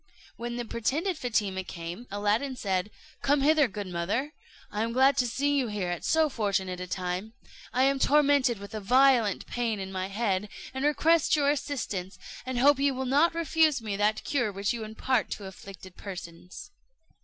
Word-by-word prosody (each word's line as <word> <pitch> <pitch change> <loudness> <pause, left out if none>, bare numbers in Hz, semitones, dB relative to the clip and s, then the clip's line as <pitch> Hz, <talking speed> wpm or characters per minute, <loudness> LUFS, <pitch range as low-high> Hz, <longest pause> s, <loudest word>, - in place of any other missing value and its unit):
When 240 0 -5
the 240 0 -3
pretended 300 - -1
Fatima 210 -9 -1
came, 175 +6 -7
Aladdin 210 +7 0
said, 190 -4 -1 0.3
"Come 285 0 +2
hither, 300 0 +4
good 205 -1 -6
mother; 195 - -2 0.4
I 210 - -2
am 230 +1 -1
glad 265 +2 +5
to 250 -2 +2
see 285 +5 0
you 265 -3 +1
here 205 -4 -3
at 175 -1 -4
so 320 -1 +3
fortunate 195 -8 -1
a 180 - -5
time. 185 +4 -3 0.4
I 255 +1 +2
am 275 0 +2
tormented 280 -4 +3
with 200 +1 -10
a 215 - -3
violent 245 -1 +3
pain 230 -4 -2
in 190 0 -5
my 185 0 -3
head, 200 -1 -1 0.2
and 265 +1 -3
request 315 +2 +3
your 285 -1 +3
assistance, 205 -11 -4 0.3
and 260 -1 -2
hope 275 +2 +5
you 280 -1 +2
will 260 +1 -3
not 290 +6 +3
refuse 320 -3 +2
me 215 -3 -4
that 210 +2 +1
cure 245 -8 0
which 200 +3 -1
you 230 -2 -4
impart 220 +3 -1
to 205 - -8
afflicted 190 -1 -11
persons." 180 -2 -9
230 Hz, 180 wpm, -28 LUFS, 195-275 Hz, 0.4 s, glad